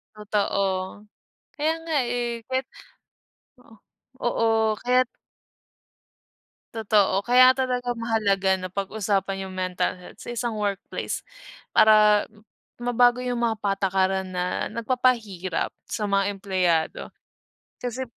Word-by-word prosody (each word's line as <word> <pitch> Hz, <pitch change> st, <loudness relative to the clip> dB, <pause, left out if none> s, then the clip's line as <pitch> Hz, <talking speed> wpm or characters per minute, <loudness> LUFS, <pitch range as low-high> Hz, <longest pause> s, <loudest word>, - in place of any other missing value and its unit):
Totoo. 205 Hz, -1 st, 0 dB, 0.9 s
Kaya 310 Hz, +2 st, +1 dB
nga 325 Hz, -2 st, -2 dB, 0.2 s
eh. 240 Hz, -1 st, -2 dB
Kaya't 260 Hz, 0 st, -1 dB, 0.9 s
oo, 230 Hz, -, -22 dB, 0.5 s
oo. 240 Hz, -1 st, +1 dB, 0.4 s
Kaya't 250 Hz, 0 st, +2 dB, 1.6 s
Totoo. 205 Hz, -3 st, +2 dB
Kaya 255 Hz, +1 st, +7 dB
talaga 250 Hz, -2 st, -1 dB
mahalaga 200 Hz, -4 st, +1 dB
na 185 Hz, -, -5 dB
pag-usapan 195 Hz, -1 st, -2 dB
yung 185 Hz, -, -9 dB
mental 185 Hz, 0 st, -1 dB
health 180 Hz, -, -14 dB
sa -, -, -8 dB
isang 240 Hz, -1 st, -2 dB
workplace 200 Hz, -1 st, -3 dB, 0.5 s
para 210 Hz, -1 st, +6 dB, 0.5 s
mabago 245 Hz, 0 st, +3 dB
yung 245 Hz, -1 st, -1 dB
mga 225 Hz, -2 st, +1 dB
patakaran 190 Hz, -2 st, 0 dB
na 180 Hz, 0 st, -2 dB
nagpapahirap 225 Hz, -5 st, -1 dB, 0.2 s
sa 210 Hz, -, -2 dB
mga 200 Hz, 0 st, +1 dB
empleyado. 180 Hz, -4 st, 0 dB, 0.7 s
Kasi 250 Hz, +1 st, -3 dB
215 Hz, 100 wpm, -25 LUFS, 195-245 Hz, 1.6 s, Kaya